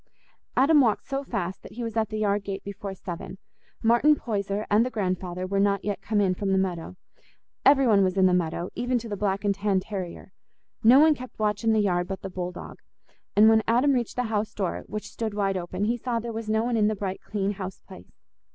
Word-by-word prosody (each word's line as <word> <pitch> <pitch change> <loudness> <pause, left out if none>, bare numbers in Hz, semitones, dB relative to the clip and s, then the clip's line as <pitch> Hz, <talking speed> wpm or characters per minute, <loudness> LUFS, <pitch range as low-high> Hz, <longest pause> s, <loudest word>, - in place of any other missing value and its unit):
Adam 290 +3 +6
walked 225 -5 +1
so 275 0 -3
fast 190 -8 -4
that - - -12
he 240 +2 -5
was 230 -1 -4
at 220 -2 +1
the 215 - -4
yard 205 -1 +1
gate 195 -1 -5
before 200 -1 -6
seven. 180 0 -7 0.5
Martin 240 +7 +5
Poyser 205 -4 -3
and 210 +2 +4
the 250 - -1
grandfather 185 -4 -2
were 195 +1 -1
not 200 -1 +1
yet 205 -1 -2
come 210 -1 0
in 190 -2 +3
from 195 +1 -2
the 190 - +3
meadow: 185 -2 -2 0.7
every 275 -1 +6
one 205 -4 +5
was 185 0 0
in 190 - +5
the 185 - +4
meadow, 175 0 -1
even 245 +2 0
to 235 0 -5
the 210 - -3
black 200 0 -1
and 200 - +3
tan 200 -1 +1
terrier—no 195 +5 -1
one 310 +1 +6
kept 255 -3 -10
watch 210 0 -1
in 225 - +3
the 220 - +3
yard 175 -3 +1
but 195 - -6
the 195 - -5
bull 180 -1 -4
dog; 180 - -10 0.6
and 210 +2 +7
when 220 0 +6
Adam 250 +5 +3
reached 240 -3 -1
the 250 - 0
house 220 -2 -2
door, 190 -4 -2
which 210 +1 -5
stood 220 -3 -4
wide 195 -2 0
open, 185 +2 -3
he 235 +3 0
saw 240 0 -2
there 230 0 -5
was 220 -1 -5
no 220 +1 +2
one 240 0 0
in 210 -1 +3
the 215 - 0
bright 195 -1 -4
clean 200 -1 -2
house 190 -2 -6
place. 190 - -15
205 Hz, 235 wpm, -26 LUFS, 190-230 Hz, 0.7 s, and